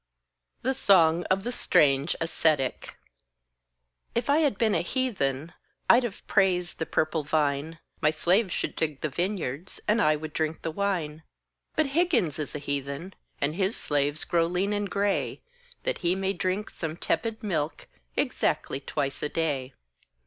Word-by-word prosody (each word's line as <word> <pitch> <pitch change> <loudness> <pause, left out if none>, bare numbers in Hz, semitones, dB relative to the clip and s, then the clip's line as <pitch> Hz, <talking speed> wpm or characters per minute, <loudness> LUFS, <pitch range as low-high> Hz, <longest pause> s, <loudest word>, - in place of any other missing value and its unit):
The 265 +2 +2
Song 175 -7 +4
of 195 +1 +1
the 240 - -2
Strange 145 - +3
Ascetic 155 -5 +1 1.2
If 235 +4 +1
I 295 - +5
had 285 -10 +2
been 220 -2 +2
a - - +2
Heathen, 170 - -1 0.4
I'd 240 - +6
have 235 -5 -5
praised 180 -3 +2
the 160 - -2
purple 155 0 +1
vine, 150 +1 0 0.2
My 155 - +5
slaves 180 +6 +2
should - - -2
dig 150 -3 -2
the 155 - -1
vineyards, 175 -1 -3
And 215 +2 +3
I 155 -5 +4
would 155 0 -6
drink 160 0 -2
the 165 - -2
wine; 165 -5 -1 0.5
But 310 - +3
Higgins 250 - +2
is 150 - -4
a - - 0
Heathen, 140 +5 -4 0.3
And 145 +2 0
his 195 +4 0
slaves 145 +1 0
grow 165 -1 +2
lean 185 +4 0
and 205 -1 -1
grey, 200 +1 0 0.4
That - - -1
he 175 0 +1
may 195 0 0
drink 185 +3 -2
some 160 -1 -5
tepid 225 +4 -1
milk 160 -7 -2 0.3
Exactly 135 - 0
twice 140 0 -3
a 150 - -1
day. 140 -6 -2
170 Hz, 155 wpm, -27 LUFS, 150-200 Hz, 1.2 s, I'd